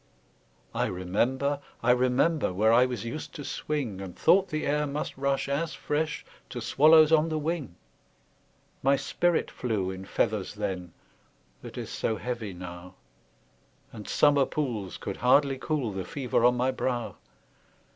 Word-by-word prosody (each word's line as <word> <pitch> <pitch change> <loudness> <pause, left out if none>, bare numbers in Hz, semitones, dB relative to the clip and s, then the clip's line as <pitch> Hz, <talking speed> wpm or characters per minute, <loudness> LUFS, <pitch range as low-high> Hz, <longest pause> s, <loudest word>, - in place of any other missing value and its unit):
I - - 0
remember, 125 +11 0 0.2
I 125 - +5
remember, 130 - +2
Where 110 +5 +3
I 125 +2 +6
was 125 -2 -5
used 135 +7 -6
to 145 - -6
swing, 125 -11 -3
And 95 -2 -8
thought 195 +1 +4
the 155 0 -2
air 150 +1 +1
must 145 +2 -4
rush 140 0 0
as 155 +4 -2
fresh 150 +1 -2 0.2
To - - -5
swallows 155 +2 +6
on 160 0 +4
the 155 - -1
wing; 155 - -3 1.1
My 135 +1 +4
spirit 175 +4 0
flew 105 -6 -2
in 95 0 -8
feathers 105 0 -1
then, 95 -4 -4 0.7
That - - -10
is - - -5
so 110 - -1
heavy 115 -1 -4
now, 90 0 -9 1.0
And 105 -3 -9
summer 145 -2 +4
pools 115 -11 -3
could - - -5
hardly 135 +1 +3
cool 140 -7 -1
The 95 -1 -4
fever 125 +3 0
on 125 0 +4
my 125 +2 +2
brow! 125 -2 -3
125 Hz, 150 wpm, -28 LUFS, 105-150 Hz, 1.1 s, I